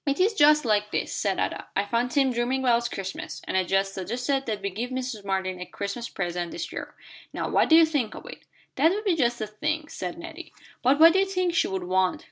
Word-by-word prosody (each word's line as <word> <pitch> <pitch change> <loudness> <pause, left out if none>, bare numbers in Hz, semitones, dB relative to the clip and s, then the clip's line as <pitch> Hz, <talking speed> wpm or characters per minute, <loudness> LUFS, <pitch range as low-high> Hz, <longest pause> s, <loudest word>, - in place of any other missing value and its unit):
"It 280 +3 0
is 400 +5 +3
just 300 -5 +5
like 210 -2 +1
this," - - -2
said 195 -2 0
Ada; - - -2
"I 200 - +1
found 235 +4 0
Tim 270 -1 +2
dreaming 245 +3 0
about 235 -2 +2
Christmas, 195 -1 -6
and - - -2
I 190 - +3
just 195 +2 0
suggested 245 +8 -2
that 210 -3 -3
we 200 - -2
give 230 +6 -4
Mrs. 255 -4 -4
Martin 190 -2 -2
a - - -4
Christmas 200 +4 -5
present 175 -2 -3
this - - -6
year. - - -7 0.4
Now - - -2
what - - +2
do 320 - +7
you 330 0 +8
think 290 -8 -1
of - - -10
it?" - - -9 0.4
"That 325 - +5
would 420 +3 -3
be 375 -4 +3
just 240 -5 +1
the 220 - -3
thing," 305 +9 -3
said 180 -1 -5
Nettie. 340 0 -9 0.3
"But 265 +4 +3
what 330 +1 +8
do 380 - +3
you 390 - +2
think 365 -2 0
she - - +2
would 190 -1 -3
want?" 185 0 +1
240 Hz, 245 wpm, -26 LUFS, 195-305 Hz, 0.4 s, you